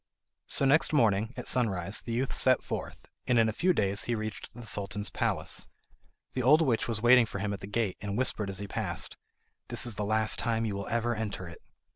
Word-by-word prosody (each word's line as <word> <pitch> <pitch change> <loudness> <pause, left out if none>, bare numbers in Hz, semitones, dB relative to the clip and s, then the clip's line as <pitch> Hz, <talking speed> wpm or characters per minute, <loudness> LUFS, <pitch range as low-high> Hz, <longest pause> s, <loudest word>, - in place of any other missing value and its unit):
So 140 - +3
next 150 +4 +4
morning 110 -5 +3
at 125 - -6
sunrise 100 -6 +1
the 120 - -6
youth 125 +3 -1
set 130 -1 +3
forth, - - -6 0.2
and 125 - +3
in 115 -1 +5
a 110 - -1
few 185 +10 +2
days 100 - 0
he 120 - 0
reached 110 -1 -5
the 120 -1 -9
Sultan's 105 0 -2
palace. - - -2 0.7
The 130 - -1
old 150 +6 +6
witch 120 -7 +1
was 110 -1 -2
waiting 120 -1 +7
for 100 - -6
him 100 +1 -2
at 100 - -5
the 95 - -8
gate, 105 -2 -1
and 100 0 -3
whispered 110 -5 0
as 95 - -5
he 100 +1 -5
passed: - - -3 0.5
"This - - +1
is 115 -4 -3
the 105 - -1
last 110 +1 +1
time 115 -1 0
you 105 -3 -2
will 100 0 -5
ever 115 +1 0
enter 105 -5 -4
it." 85 - -11
110 Hz, 220 wpm, -29 LUFS, 100-120 Hz, 0.7 s, waiting